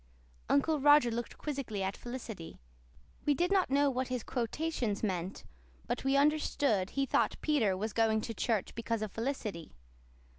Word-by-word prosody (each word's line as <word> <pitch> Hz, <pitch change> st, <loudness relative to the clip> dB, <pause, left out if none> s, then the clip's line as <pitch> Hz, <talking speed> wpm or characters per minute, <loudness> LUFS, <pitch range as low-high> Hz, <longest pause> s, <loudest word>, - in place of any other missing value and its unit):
'" -, -, -29 dB
Uncle 300 Hz, +2 st, +3 dB
Roger 290 Hz, -3 st, +6 dB
looked 235 Hz, +1 st, -4 dB
quizzically 265 Hz, -9 st, -3 dB
at 190 Hz, +1 st, -2 dB
Felicity. 235 Hz, -8 st, -7 dB, 0.6 s
We 290 Hz, -, +3 dB
did 350 Hz, +4 st, +1 dB
not 385 Hz, -2 st, +3 dB
know 280 Hz, +1 st, +3 dB
what 255 Hz, 0 st, -1 dB
his 250 Hz, -3 st, -3 dB
quotations 245 Hz, -3 st, -2 dB
meant, 185 Hz, -2 st, -2 dB, 0.4 s
but -, -, -2 dB
we 270 Hz, +1 st, +3 dB
understood 280 Hz, -8 st, +2 dB
he 275 Hz, 0 st, 0 dB
thought -, -, +1 dB
Peter 230 Hz, -12 st, +2 dB
was 215 Hz, +2 st, -3 dB
going 220 Hz, -1 st, +2 dB
to 230 Hz, -, -4 dB
church 220 Hz, -2 st, -1 dB
because 230 Hz, -1 st, -2 dB
of 215 Hz, -, -4 dB
Felicity. 225 Hz, -, -4 dB
240 Hz, 160 wpm, -32 LUFS, 215-280 Hz, 0.6 s, Roger